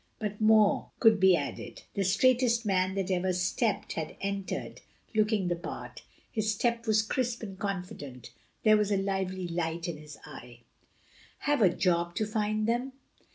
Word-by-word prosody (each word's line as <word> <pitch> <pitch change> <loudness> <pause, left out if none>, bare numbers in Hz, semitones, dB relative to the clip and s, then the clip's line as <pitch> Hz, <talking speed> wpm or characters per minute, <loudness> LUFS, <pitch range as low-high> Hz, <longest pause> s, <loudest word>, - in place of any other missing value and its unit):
Before 210 -2 -3
more 215 -1 +4
could 225 -3 +5
be 190 -1 +6
added, 145 -4 -5
"the 200 - 0
straightest 235 +4 +3
man 190 -1 +1
that 195 -1 -1
ever 185 0 +1
stepped" 185 +4 0
had 155 -1 -5
entered, 200 -1 -4 0.3
looking 215 -3 +2
the 175 - +1
part. 170 - -8 0.3
His 215 -1 0
step 235 +2 -1
was 220 0 +4
crisp 235 +1 -2
and 195 -3 -7
confident; 180 - -5 0.3
there 215 -1 +6
was 210 -1 0
a 200 - +3
lively 190 -2 -2
light 170 0 -2
in 170 -3 -4
his 150 -1 -11
eye. 125 -4 -11 0.8
"Have 290 -4 +1
a 195 - +7
job 170 -1 0
to 215 - 0
find 215 0 -1
them?" 245 +3 -1
195 Hz, 160 wpm, -29 LUFS, 180-220 Hz, 0.8 s, a